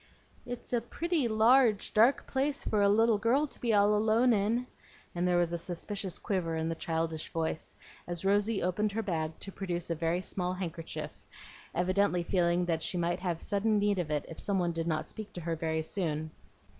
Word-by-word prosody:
"It's 245 0 -5
a 240 - +2
pretty 320 +3 -1
large, 225 0 +4
dark 230 +5 +4
place 275 +2 -1
for 210 - +1
a 200 - +5
little 225 +1 +4
girl 245 +7 +3
to 295 - -9
be 235 - +1
all 205 0 +4
alone 220 +3 +3
in;" 220 +4 +1 0.5
and 175 +1 0
there 180 -1 +3
was 175 -1 +1
a 170 - -1
suspicious 185 +2 -4
quiver 175 -5 -2
in 160 0 -1
the - - 0
childish 160 -1 -2
voice, 160 -1 -3 0.3
as 175 +1 -4
Rosy 205 +2 +2
opened 200 +4 0
her 225 +1 -1
bag 160 -5 -2
to 195 - -6
produce 175 -3 -3
a - - +3
very 165 +3 -1
small 180 -1 -2
handkerchief, 170 -3 -6 0.5
evidently 185 0 +2
feeling 175 -1 +1
that 165 -2 0
she 180 - -2
might 175 +1 0
have 175 -3 -3
sudden 210 +2 +1
need 205 -1 +2
of 170 -4 -2
it 150 -1 -1
if 165 - -8
some 200 -1 0
one 175 -2 +1
did 165 0 -3
not 155 -1 -1
speak 215 -1 -6
to 175 - -6
her 165 0 -2
very 160 0 -1
soon. 155 -3 -2
185 Hz, 200 wpm, -31 LUFS, 170-215 Hz, 0.5 s, a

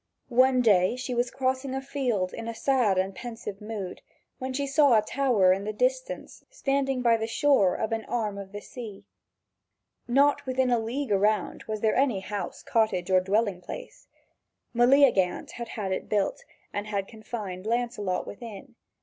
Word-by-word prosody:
One 255 +1 +4
day 195 -1 +4
she 255 0 -4
was 240 0 +1
crossing 260 +1 -1
a - - -1
field 250 -9 -1
in 230 - -6
a 230 - -4
sad 245 -7 +2
and 190 +1 0
pensive 225 -3 -7
mood, 210 -4 -6 0.4
when 260 0 -3
she 280 +2 -1
saw 280 -3 +5
a 215 - +3
tower 220 -7 +3
in 195 +1 -3
the 215 - -2
distance - - -2
standing 275 - -1
by 230 -1 +5
the 225 0 -3
shore 225 -6 +3
of 220 - -2
an 225 -1 -2
arm 215 -4 -2
of 195 -1 -8
the 205 0 -7
sea. 220 -5 -9 1.0
Not 280 +4 +3
within 255 -1 +1
a 240 - +3
league 240 +3 -3
around 210 +2 +2
about - - -16
was 215 -1 -3
there 220 -1 +3
any 255 -7 +2
house, 195 -2 -5
cottage, 195 -5 +1
or 185 0 +5
dwelling 200 -1 0
place. - - -9 0.7
Meleagant 240 -7 +4
had 235 -1 -6
had 205 -4 -4
it 190 - -3
built, 205 -2 0 0.3
and 205 +1 -3
had 200 -2 -2
confined 215 -4 -6
Lancelot 230 -5 -1
within. 230 +3 -9
225 Hz, 175 wpm, -27 LUFS, 200-260 Hz, 1.0 s, saw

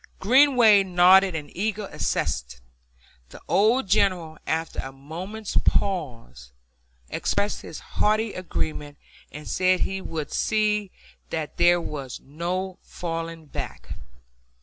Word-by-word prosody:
Greenway 245 -2 +6
nodded 185 0 +5
an 150 -2 -6
eager 210 +2 -2
assent. 60 +1 -2 0.7
The - - -12
old 220 +5 +3
General, 180 -5 +1
after 160 +1 -2
a 135 - -4
moment's 175 +11 -6
pause, 115 - -2 0.6
expressed 205 +1 -1
his 160 - -8 0.2
hearty 215 +1 +2
agreement, 150 -5 -4 0.3
and 150 +1 -9
said 185 0 +2
that - - +3
he 195 0 -2
would 160 -5 -5
see 210 -2 +1 0.4
that 155 -2 -4
there 175 0 +5
was 140 -6 -6
no 180 +5 -4
falling 165 -1 -5
back. 145 - -7
180 Hz, 115 wpm, -25 LUFS, 155-200 Hz, 0.7 s, Greenway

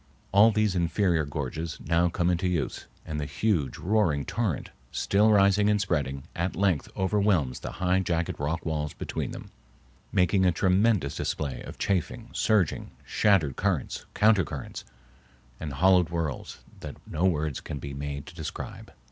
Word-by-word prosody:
All 100 +3 +7
these 105 -2 +1
inferior 85 -2 +1
gorges 75 +3 -4
now 85 +2 +2
come 90 +1 +1
into 90 +1 0
use, 90 -3 -2 0.2
and 75 -1 -4
the 75 - -3
huge, 90 -11 0
roaring 90 -7 +1
torrent, 110 - -2 0.2
still 105 +2 +3
rising 100 0 +4
and 105 0 +3
spreading, 70 -9 -1
at 85 +2 -2
length 95 -6 +1
overwhelms 95 - +1
the - - -6
high 90 +1 +1
jagged 85 -2 -1
rock 75 +3 -2
walls 75 -2 -2
between - - -4
them, - - -9 0.6
making 95 +1 +3
a 90 - +5
tremendous 95 -2 +2
display 70 -4 -3
of - - -9
chafing, 100 +5 -2
surging, 105 -7 +1 0.2
shattered 90 -11 +2
currents, - - -1
counter 105 -2 +5
currents, - - -7 0.7
and 75 - -5
hollow 90 +5 +5
whirls 80 -4 -4 0.2
that - - -8
no 85 +4 -1
words 75 -6 0
can - - -6
be 70 +1 -6
made 70 0 -5
to - - -11
describe. - - -7
85 Hz, 155 wpm, -27 LUFS, 75-100 Hz, 0.7 s, All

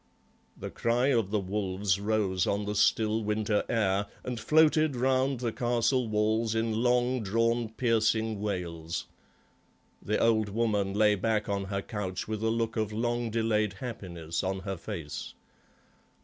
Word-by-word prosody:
The - - -6
cry 120 +3 +1
of 115 -7 +2
the 105 0 +1
wolves 95 0 -1
rose 100 -3 0
on 100 +1 0
the 105 - -2
still 110 +1 +2
winter 105 0 0
air 100 -3 +1 0.2
and 125 -2 -4
floated 155 +1 +4
round 130 +1 +1
the 120 -2 -1
castle 120 +1 +1
walls 110 +1 +1
in 110 0 0
long 125 +1 +2
drawn 115 +3 +1
piercing 110 -2 +1
wails; 85 -5 -3 1.0
the 105 - 0
old 110 -2 +2
woman 100 -2 0
lay 105 0 +4
back 105 +1 0
on 100 -1 -1
her 100 0 -3
couch 95 -5 -4
with 110 -1 -3
a 110 - +1
look 115 0 -1
of 110 -1 -1
long 120 +2 -1
delayed 110 -2 +1
happiness 90 -8 -5
on 95 0 -2
her 95 0 -4
face. 85 -4 -6
110 Hz, 150 wpm, -29 LUFS, 100-115 Hz, 1.0 s, floated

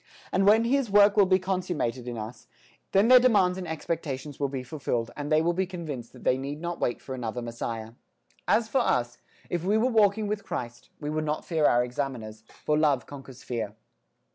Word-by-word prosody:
And 195 +1 +2
when 220 +2 +6
His 260 0 +1
work 205 0 +6
will 200 -3 +5
be 185 0 +5
consummated 175 -10 -2
in 120 -1 -4
us, 110 +3 -8 0.4
then 195 +3 +4
their 255 +1 +9
demands 205 -8 +4
and 180 - -5
expectations 150 -3 -4
will 140 -1 0
be 130 -2 -4
fulfilled 120 -4 -3
and 145 +1 -5
they 155 +1 +4
will 170 +1 +2
be 190 +1 -1
convinced 155 -10 -6
that - - -14
they 130 - +2
need 140 +2 -5
not 170 +1 -4
wait 120 - -1
for 135 - -7
another 125 -2 -4
Messiah. 115 -1 -5 0.6
As 225 0 +3
for 260 +3 +2
us, 120 - 0 0.3
if 175 -2 -2
we 205 +4 +2
were 250 +4 +2
walking 215 -1 +3
with 205 0 -3
Christ, 120 -9 -6
we 150 0 -4
would 155 0 -1
not 150 0 -2
fear 160 -3 +1
our 120 0 +4
examiners: 120 -4 -5 0.2
for 150 - +2
love 145 -5 +2
conquers 135 -2 -11
fear. 110 -5 -4
150 Hz, 205 wpm, -27 LUFS, 125-190 Hz, 0.6 s, their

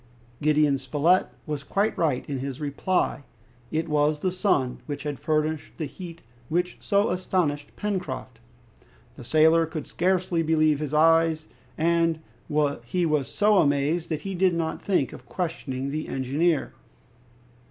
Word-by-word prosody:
Gideon 150 -2 +3
Spilett 145 +7 +2 0.2
was 150 -2 -4
quite 200 +8 0
right 150 -7 0
in 140 -2 -3
his 135 +1 -5
reply. 150 +4 0 0.5
It 160 +1 -1
was 150 0 +2
the 185 +5 -1
sun 175 -9 +1
which 145 -2 -4
had 145 -3 -4
furnished 155 0 -1
the 160 - -2
heat 170 +2 -9 0.3
which 175 +2 -1
so 200 -2 +2
astonished 175 -5 -1
Pencroft. 180 - -4 0.8
The 130 - -10
sailor 160 +5 +4
could 155 -3 -5
scarcely 180 -1 +1
believe 155 -2 +3
his 150 -1 -3
eyes, 165 0 +4 0.3
and 165 0 +2 0.7
he 175 +9 0
was 150 -4 +1
so 210 0 +3
amazed 145 +4 +1
that 155 -2 -2
he 195 - -4
did 185 -1 +2
not 165 -1 -2
think 180 -9 0
of - - -12
questioning 140 -6 -3
the 155 +1 -3
engineer. 145 +5 0
155 Hz, 140 wpm, -26 LUFS, 145-175 Hz, 0.8 s, sailor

